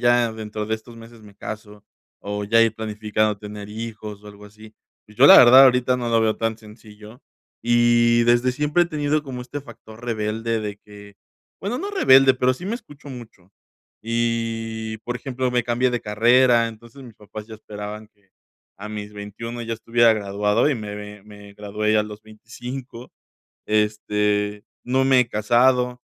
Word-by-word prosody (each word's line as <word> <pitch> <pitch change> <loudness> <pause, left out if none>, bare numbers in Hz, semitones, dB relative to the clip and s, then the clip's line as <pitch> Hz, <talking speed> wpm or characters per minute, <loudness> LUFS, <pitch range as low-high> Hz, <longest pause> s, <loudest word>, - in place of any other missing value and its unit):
ya, 120 -1 +3
dentro 110 -1 -6
de 110 - -1
estos 115 +2 -12
meses 115 0 -14
me 105 -1 -16
caso". 105 0 -9 0.4
O 105 0 -4
ya 115 +3 +3
ir 115 -1 +1
planificando 110 -1 -1
tener 105 0 -9
hijos 105 -1 -8
o - - -12
algo 105 0 -13
así. 110 +1 -16 0.3
Pues 105 - -19
yo 135 - +8
la - - +10
verdad, 130 +2 +9
ahorita 125 -1 +3
no 120 -1 -3
lo 115 -1 +2
veo 110 -1 +1
tan 115 -1 -2
sencillo 110 +2 -15 0.4
y 120 0 +3
desde 120 +2 +3
siempre 150 +5 +1
he - - 0
tenido 150 -2 -1
como 130 -4 -7
este 135 +4 -7
factor 115 -3 -14
rebelde 115 0 -2
de 105 -1 -5
que 100 -1 -15 0.4
bueno, 210 +6 -3
no 400 - -4
rebelde, 135 - +5
pero 130 0 +1
sí 175 - -11
me 215 - -2
escucho 145 - -15
mucho 115 -8 -12 0.5
y, 115 -1 -2
por 120 0 -3
ejemplo, 130 0 -3
me 125 0 +1
cambié 120 +2 0
de 120 -1 -2
carrera. 120 +3 +3
Entonces, 115 +4 -13
mis 120 -3 -13
papás 105 +1 -10
ya 110 - -10
esperaban 105 0 -9
que 105 -3 -37 0.5
a 105 +2 -8
mis 105 -1 -7
21 105 +4 -7
ya 115 0 -3
estuviera 115 +1 +3
graduado 105 +3 0
y 150 - +1
me 105 -3 -6
me, 105 -1 -10
me 105 -1 -14
gradué 105 +1 -1
a 105 - +3
los 105 0 -9
25 120 +3 -10 0.5
Este, 105 -1 0 0.2
no 130 +2 +1
me 135 -1 +5
he 125 - 0
casado. 125 +3 +2
115 Hz, 175 wpm, -22 LUFS, 105-120 Hz, 0.5 s, la